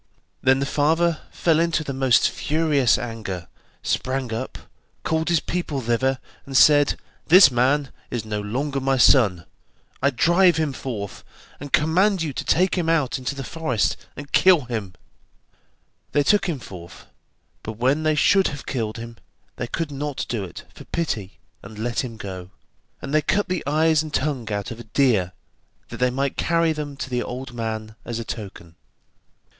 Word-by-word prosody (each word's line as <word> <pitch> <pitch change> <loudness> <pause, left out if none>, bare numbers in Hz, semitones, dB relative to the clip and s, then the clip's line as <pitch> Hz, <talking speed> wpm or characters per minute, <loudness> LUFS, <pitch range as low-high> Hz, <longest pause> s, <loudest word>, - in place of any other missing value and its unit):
Then 130 0 +4
the 140 - -1
father 160 +3 +1
fell 165 -2 +1
into 165 -1 +1
the 140 - -4
most 130 -3 +4
furious 150 -5 +2
anger, 105 -7 -5 0.4
sprang 130 -2 -1
up, 130 +4 -4 0.5
called 160 +1 0
his 170 -2 +3
people 170 -5 -3
thither, 130 +2 0 0.3
and 135 -1 -1
said: 145 -1 +6 0.3
'This 175 -3 +8
man 135 +3 +1 0.2
is 120 -3 -4
no 105 -1 -3
longer 135 +7 -2
my 135 0 +1
son, 105 - +4 0.6
I 140 - +4
drive 170 +7 +4
him 155 -3 0
forth, 105 -7 -6 0.4
and 145 0 -8
command 180 +4 +3
you 150 -4 -3
to - - -4
take 185 +2 +2
him 165 -2 0
out 150 -6 +1
into 130 +2 -3
the 135 - -5
forest, 130 -6 -1 0.2
and 145 0 -9
kill 185 -4 +5
him.' 110 -7 -5 1.2
They 145 0 +3
took 195 +4 +3
him 160 - -1
forth, 90 -7 -11 0.6
but 110 - -6
when 130 +6 +2
they 155 -1 +2
should 190 +6 +4
have 140 -1 -6
killed 110 -5 -3
him, 115 0 -8 0.4
they 125 - -3
could 160 +4 -3
not 145 0 -4
do 115 -4 -2
it 90 - -9
for - - -12
pity, 110 - -3 0.2
and 110 - -11
let 115 +4 -1
him 115 -3 -7
go, 95 -4 -7 0.5
and 140 - -5
they 155 - +4
cut 205 +7 0
the 185 -1 -1
eyes 155 +1 +3
and 155 -1 -7
tongue 130 -7 -2
out 100 +1 -3
of 115 - -7
a - - -8
deer 110 -6 +1 0.6
that - - -7
they 125 0 +2
might 135 +2 -2
carry 165 -1 +2
them 145 -2 -6
to 130 - -5
the 125 -1 0
old 125 +1 -6
man 110 -2 -4
as 120 - -4
a 115 - -5
token. 95 -7 -8
135 Hz, 175 wpm, -23 LUFS, 115-155 Hz, 1.2 s, This